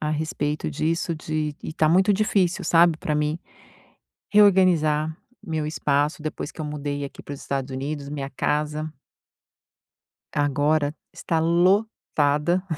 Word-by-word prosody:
a 150 - -1
respeito 150 - -2
disso, 165 - -1
de 155 -1 -3
e - - -5
tá 155 0 +2
muito 190 +5 +4
difícil, 190 -3 +1
sabe, 165 -1 +5
pra 155 -1 -2
mim 150 +2 0 0.9
reorganizar 170 -7 +4 0.3
meu 155 -2 -3
espaço, 150 0 0
depois 155 -1 -5
que - - -10
eu - - -2
mudei 145 -1 -4
aqui 140 - -9
para 145 - -7
os - - -11
Estados 135 -1 -3
Unidos, 140 +1 -4
minha 140 -1 -5
casa 150 +2 -2 1.4
agora 145 +1 +1 0.2
está 165 - -1
lotada. 170 -2 +2
155 Hz, 130 wpm, -24 LUFS, 145-170 Hz, 1.4 s, sabe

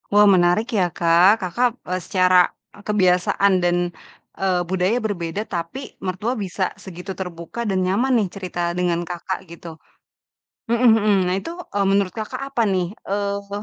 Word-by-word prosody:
Wah, 205 +1 +6
menarik 185 +2 +4
ya, 185 -5 +2
Kak. 175 +5 +4
Kakak, 190 +8 +1 0.2
e 185 - -2
secara, 185 0 +4 0.2
e - - -16
kebiasaan 195 -1 +3
dan, 175 0 +2 0.6
eee, 185 -2 +1
budaya 185 +5 +1
berbeda 200 -1 -3
tapi 175 +9 -6
mertua 190 +6 -2
bisa 190 -3 -2
segitu 185 0 -8
terbuka 180 +5 -6
dan 185 -1 +1
nyaman 240 +7 +2
nih 210 -4 +1
cerita 175 -3 -3
dengan 175 -1 0
Kakak, 180 +2 -5
gitu. 170 -1 -10 0.9
Mhm 235 -1 +5
mhm. 210 -1 +3
Nah, 180 - +1
itu, 330 - -7 0.2
e - - +1
menurut 195 -2 +1
Kakak 220 +4 -5
apa 235 - +2
nih? 185 -1 -1 0.2
Eee, 200 0 -1
s 200 - -23
190 Hz, 160 wpm, -21 LUFS, 175-205 Hz, 0.9 s, Wah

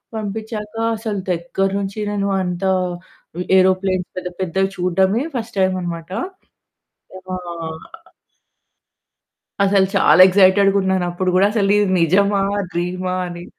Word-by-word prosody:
పంపిచ్చాక 215 0 -5 0.2
అసలు 215 -2 -4
దగ్గర 180 +3 -1
నుంచి 200 +1 -4
నేను 200 -1 -1
అంత 180 +1 -4 0.7
వి 180 - -2
ఏరోప్లేన్స్ 185 0 +2
పెద్ద 180 0 -4
పెద్దవి 190 +2 0
చూడడమే 190 +6 +1
ఫస్ట్ 225 -3 -5
టైమనమాట. 180 -2 -2 1.0
విమా 185 0 -6 2.3
అసలు 195 -1 +3
చాలా 155 +4 +5
ఎక్సైటెడ్‌గున్నానుప్పుడు 190 -2 +2
గూడా 195 +2 +5
అసలు 200 -3 +1
ఇది 205 - +2
నిజమా 200 +4 +2 0.3
డ్రీమా 180 +1 -2
అని. 175 0 -8
190 Hz, 100 wpm, -19 LUFS, 180-200 Hz, 2.3 s, చాలా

